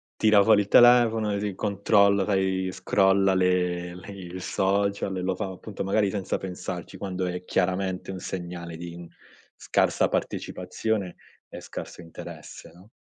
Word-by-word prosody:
tira 105 -2 +5
fuori 105 -1 +5
il 100 - -4
telefono 115 -2 +5
e 100 0 -2
s - - -10
controlla, 100 0 +3
sai 95 -2 0
scrolla 95 +1 +2
le 90 -1 +1
le 90 +3 -11
il 90 -2 -8
social 100 +1 0
e 90 - -3
lo 95 0 -1
fa 105 - -3
appunto, 95 +2 -7
magari 100 +1 +1
senza 100 -2 -2
pensarci, 90 -2 -6
quando 95 -2 -3
è 90 0 -4
chiaramente 95 +1 -1
un 95 - -4
segnale 85 -3 -6
di 85 0 -8 0.5
scarsa - - +1
partecipazione 105 -5 -3 0.3
e - - -9
scarso - - -8
interesse, 80 -1 -10
no? 90 +4 -18
95 Hz, 145 wpm, -26 LUFS, 90-100 Hz, 0.5 s, tira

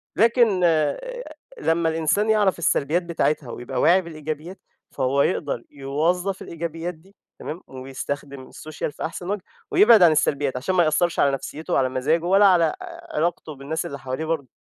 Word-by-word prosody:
لكن 230 -2 +4 1.0
لمَّا 165 0 +1
الإنسان 165 +7 +1
يعرف 205 -5 +3
السلبيات 160 +2 +1
بتاعتها، 155 -6 -1
ويبقى 120 +3 -4
واعي 185 +3 +5
بالإيجابيات، 155 +1 -7 0.3
فهو 135 +1 +1
يقدر 140 -8 -1
يوظّف 165 +8 -1
الإيجابيات 170 +1 -5
دي، 185 +5 -22 0.2
تمام، 165 +4 -6
ويستخدم 135 +1 -6
السوشيال 155 -1 -6
في 145 - -5
أحسن 175 +2 -6
وجه، 205 -1 -2 0.3
ويبعد 220 -3 +7
عن 170 - +7
السلبيات، 140 -3 +1
عشان 165 +9 -2
ما 175 - +5
يأثّرش 165 +2 +1
على 140 - +4
نفسيّته 145 +3 -5
وعلى 130 -1 +2
مزاجه، 150 +6 0
ولا 195 +3 +5
على 180 -3 +5
ع - - -1 0.4
علاقته 160 -1 -1
بالناس 140 +4 -4
اللي 140 0 -6
حواليه 130 +4 -4
برضه. 155 -5 -2
160 Hz, 155 wpm, -23 LUFS, 140-180 Hz, 1.0 s, ويبعد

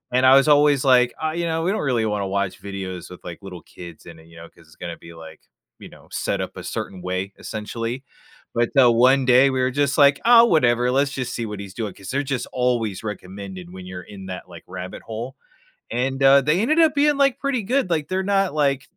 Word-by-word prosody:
And 130 +1 +3
I - - +8
was 135 - 0
always 145 -2 +3
like, 125 -1 +4
"Ah," 155 0 -1
you 170 - -1
know, 160 0 -1
"we 185 - +1
don’t 175 -9 -2
really 115 -3 +1
wanna 100 -2 -2
watch 100 -2 -2
videos 95 -3 -6
with, 90 - -11
like, 85 - -8
little 90 -3 -10
kids 85 -3 -10
in 80 -1 -13
it," 80 - -18
you 85 - -15
know, 85 - -11
'cause 85 - -22
it’s 80 - -22
gonna 85 -1 -7
be, - - -11
like, 80 - -15 0.4
you - - -9
know, - - -17
set - - -2
up - - -17
a - - -7
certain 95 - -5
way 95 0 -1 0.2
essentially. 115 +2 -4 0.6
But, 120 0 +1
uh, 120 - +6
one 130 +3 +4
day, 130 +2 +7
we 130 -1 -1
were 130 0 +1
just 140 +2 -1
like, 140 -1 +5
"Oh, 235 0 +8
whatever, 125 -4 +2
let’s 140 +1 +1
just 125 - -4
see 115 - -3
what 105 -1 -6
he’s 100 -1 -10
doing," 105 -4 -3
'cause 95 - -11
they’re 140 +2 -1
just - - -5 0.2
always 115 -6 0
recommended 95 -2 -10
when 95 -1 -10
you’re 90 -1 -8
in 95 - -10
that, 90 -1 -7
like, 85 - -12
rabbit 90 0 -8
hole. 115 +3 -5 0.6
And, 135 +3 -1
uh, 135 +1 +7
they 150 +8 +1
ended 310 +8 +2
up 315 -3 +4
being, 290 0 +3
like, 275 -2 +3
pretty 260 -5 -1
good, 275 -9 +1
like, 155 -3 0
they’re 190 0 -1
not, 195 -5 +1
like 140 -1 0
125 Hz, 240 wpm, -22 LUFS, 95-145 Hz, 0.6 s, I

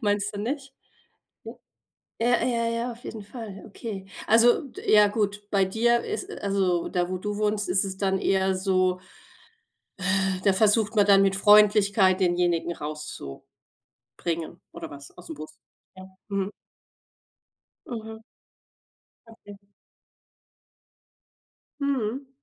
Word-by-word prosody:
Meinst 205 -2 0
du 205 - -4
nicht? 275 +4 -4 0.7
Ja. - - -7 0.7
Ja, 240 +1 +3
ja, 235 -2 0
ja, 230 +1 -2
auf 235 +1 -13
jeden 220 - -7
Fall, 205 -3 -9
okay. 205 -2 -7 0.2
Also, 230 +4 +5 0.2
ja 210 -1 +6
gut, 205 -1 -2
bei 200 -2 +3
dir 235 +5 +2
ist 420 - -5
also, 190 -3 0
da 175 0 -1
wo 185 - -2
du 205 +2 -4
wohnst, 210 0 0
ist 190 +2 +2
es 190 -1 -5
dann 190 -1 0
eher 190 0 +1
so 185 -1 +1 1.0
äh, 190 0 0
da 195 - +4
versucht 215 +2 +2
man 205 - +5
dann 195 -1 +6
mit 195 0 +2
Freundlichkeit 205 -2 +5
denjenigen 175 -2 +1
rauszubringen 150 - -8 1.1
oder 170 -1 -8
was 140 -1 -12
ausm 325 - -9
Bus. 155 - -10 0.4
Ja. 185 - -10 0.2
Mhm. 200 -1 -2 1.4
Mhm. 220 -2 -7 1.1
Okay. 205 -3 -14 2.2
Mhm. 270 -1 -2
205 Hz, 120 wpm, -26 LUFS, 190-225 Hz, 2.2 s, ja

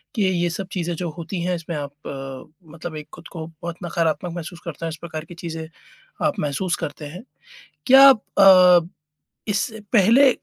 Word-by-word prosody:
कि 215 - +1
ये 175 -2 +1
सब 185 +3 -5
चीज़ें 175 -2 -2
जो 175 +1 -4
होती 170 +2 -5
हैं, 180 0 0
इसमें 165 0 -6
आप, 145 -1 -5 0.7
मतलब 160 +1 -8
एक 150 - -8
ख़ुद - - -12
को 160 -4 -6
बहुत 165 +1 -8
नकारात्मक 170 +1 -1
महसूस 170 0 -7
करते 165 0 -5
हैं - - -2
इस 155 - -7
प्रकार 160 -1 -7
की 175 - -12
चीज़ें, 165 -1 -6 0.6
आप - - 0
महसूस 160 +5 -1
करते 150 -2 -6
हैं। 180 +8 -9 0.6
क्या 270 +1 +9
आप 260 -6 +5 0.2
अ, 180 -3 +7 0.6
इससे 210 +2 -1
पहले 235 +7 +6
170 Hz, 180 wpm, -22 LUFS, 160-185 Hz, 0.7 s, क्या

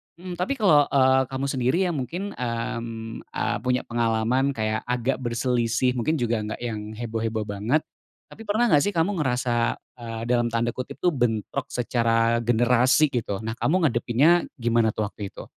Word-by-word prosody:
mhm, 175 0 -8
tapi 185 +10 0
kalau, 155 - +4
eee, 130 -1 +4
kamu 135 +1 -3
sendiri 130 +4 +1
yang - - -4
mungkin, 180 +11 -4
mmm, 115 - -4 0.2
eee, - - 0
punya 125 0 0
pengalaman 120 +3 0
kayak 110 0 -1
agak 125 +2 0
berselisih 120 0 0
mungkin 125 +6 0
juga 120 -5 0
nggak 105 +2 -5
yang 110 -2 -5
heboh-heboh 115 -1 -2
banget, 105 +9 0 0.5
tapi - - -12
pernah 215 +4 +2
nggak 145 - +6
sih 205 - +1
kamu 175 +4 +1
ngerasa, 125 -3 0 0.2
eee, 115 -2 -6
dalam 120 -1 +2
tanda 115 0 +1
kutip 130 - -6
tuh 180 - +4
bentrok 120 +1 -1
secara 115 -1 +1
generasi 120 +5 +4
gitu 105 -5 -2
nah 110 - -2
kamu 175 +6 +2
ngadepinnya 140 +6 +3
gimana 115 -2 +2
tuh 110 - -1
waktu 100 -1 -7
itu? - - -9
120 Hz, 165 wpm, -25 LUFS, 115-135 Hz, 0.5 s, nggak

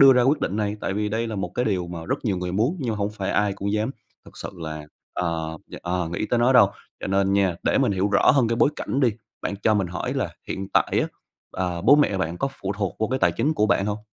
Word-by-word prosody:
đưa 135 -1 +10
ra 125 -1 +4
quyết 135 +5 +3
định 100 - -1
này, 105 -1 -1
tại 95 - -2
vì 105 +1 0
đây 110 +2 -1
là 110 -2 -4
một 90 -3 -4
cái 125 - +1
điều 95 -6 0
mà 85 -1 -6
rất - - -2
nhiều 100 -5 +1
người 90 0 -3
muốn 115 - +1
nhưng 125 -4 -1
mà 110 - -2
hông 100 0 -1
phải 100 -3 -3
ai 105 -1 +2
cũng 100 +1 -3
dám 110 +3 0 0.3
thực - - -16
sự - - -6
là, 80 -2 -6 0.3
ờ, 80 -2 -2
dạ, - - -8
ờ, 90 -1 -1
nghĩ 85 +5 -2
tới 120 - +1
nó 120 +2 +4
đâu, 115 -6 +7 0.3
cho - - -4
nên 95 0 +2
nha 95 -3 +2
để - - +2
mình - - +2
hiểu 95 +1 +1
rõ - - +5
hơn 130 -5 +3
cái 115 - 0
bối 140 - +4
cảnh 135 - -2
đi, 130 - +5 0.3
bạn - - -2
cho 110 - +4
mình 100 -3 +1
hỏi 90 - -3
là - - -2
hiện 95 0 -4
tại - - +2
á, - - -1 0.4
ờ, 90 -2 -2
bố 140 +10 +6
mẹ 145 -9 +3
bạn 85 -2 -2
có 135 - 0
phụ 95 - -2
thuộc 100 -4 -2
vô 110 - +1
cái 130 +3 -1
tài - - +3
chính 145 +7 0
của 105 - +2
bạn 100 -1 +2
hông? 105 0 -1
100 Hz, 290 wpm, -24 LUFS, 90-115 Hz, 0.4 s, đưa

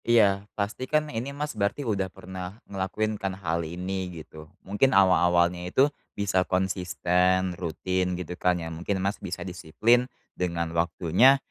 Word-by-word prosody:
Iya, 105 -3 +4
pastikan 130 +9 -1
ini 115 +4 -3
Mas 145 +2 -4
berarti 105 +6 -1
udah 100 -4 0
pernah 95 +1 -8
ngelakuin 105 +2 -2
kan 95 -1 -2
hal 85 -3 -1
ini 90 +3 -4
gitu. 80 -2 -11 0.2
Mungkin 105 +7 +3
awal-awalnya 90 -2 +4
itu 140 +9 +3 0.2
bisa 100 -2 +2
konsisten 90 0 +1
rutin 90 +1 -2
gitu 90 -1 -5
kan 90 0 +1
ya, 80 -1 -5
mungkin 90 +5 -2
Mas 100 +2 -2
bisa 90 0 -5
disiplin 110 +8 +1 0.2
dengan 85 -2 -2
waktunya, 85 +9 +4
95 Hz, 140 wpm, -27 LUFS, 90-105 Hz, 0.2 s, Iya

